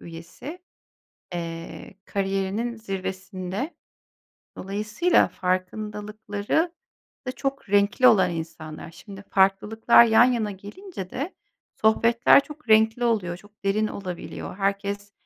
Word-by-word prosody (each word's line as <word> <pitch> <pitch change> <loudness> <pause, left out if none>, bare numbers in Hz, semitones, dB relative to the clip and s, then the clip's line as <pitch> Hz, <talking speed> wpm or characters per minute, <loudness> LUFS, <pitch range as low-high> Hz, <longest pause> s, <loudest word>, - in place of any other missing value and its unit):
üyesi, 170 - -10 0.7
eee, 165 -1 -6
kariyerinin 195 +4 -2
zirvesinde. 190 - -5 0.8
Dolayısıyla 210 - +1
farkındalıkları 210 - -2 0.5
da 255 - -2
çok 275 -4 -4
renkli 205 +5 +4
olan 185 -6 +6
insanlar. 160 -1 -7
Şimdi, 195 +4 -11
farklılıklar 210 +5 +5
yan 225 +1 +6
yana 235 -4 +1
gelince 200 - -9
de 290 +8 -4 0.5
sohbetler 230 +4 +5
çok 300 -3 -13
renkli 220 +2 +4
oluyor, 200 -7 0
çok 205 +3 -21
derin 215 +2 +2
olabiliyor. 185 -2 -6
Herkes 200 0 -2
205 Hz, 100 wpm, -25 LUFS, 190-230 Hz, 0.8 s, olan